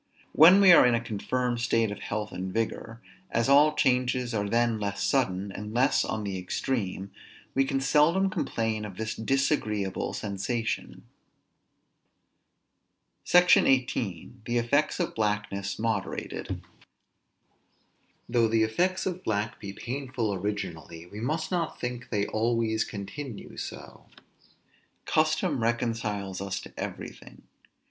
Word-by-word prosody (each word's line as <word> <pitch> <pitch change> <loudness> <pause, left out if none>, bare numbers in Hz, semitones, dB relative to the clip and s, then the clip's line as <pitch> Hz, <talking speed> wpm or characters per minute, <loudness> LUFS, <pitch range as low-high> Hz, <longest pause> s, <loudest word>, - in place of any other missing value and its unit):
When 175 +5 +8
we 190 -2 +8
are 170 - +9
in 125 -1 +4
a - - +1
confirmed 120 +2 -2
state 115 -2 +1
of 105 - -6
health 105 0 -4
and 95 +1 -5
vigor, 115 +1 -3 0.3
as 115 +1 +1
all 150 +2 +6
changes 125 -2 +1
are 105 -2 -1
then 115 0 +2
less 100 -1 -2
sudden, 100 -7 0
and 105 +3 -7
less 130 +4 +3
on 110 - -3
the 95 -2 -3
extreme, 95 0 -3 0.4
we 135 0 +3
can 135 0 0
seldom 165 +8 +3
complain 110 -8 -2
of 100 -3 -8
this 110 0 -3
disagreeable 110 -6 -1
sensation. 110 +3 -3 2.2
SECTION 180 0 +6
XVIII. 125 -9 0 0.2
THE 120 0 0
EFFECTS 140 +6 +1
OF - - -1
BLACKNESS 105 -2 -2
MODERATED. 110 -3 -3 1.6
Though 120 -1 +3
the 110 0 +2
effects 180 +13 0
of 185 0 -3
black 105 0 -2
be 100 - -6
painful 125 -1 -3
originally, 90 -4 -5
we 100 +4 -10
must 155 +9 -2
not 175 -3 -2
think 125 0 -5
they 100 -2 0
always 110 0 0
continue 105 +4 -7
so. - - -8 1.0
Custom 155 -5 +1
reconciles 115 -5 -1
us 100 0 -3
to - - -12
everything. - - -8
115 Hz, 125 wpm, -28 LUFS, 105-130 Hz, 2.2 s, are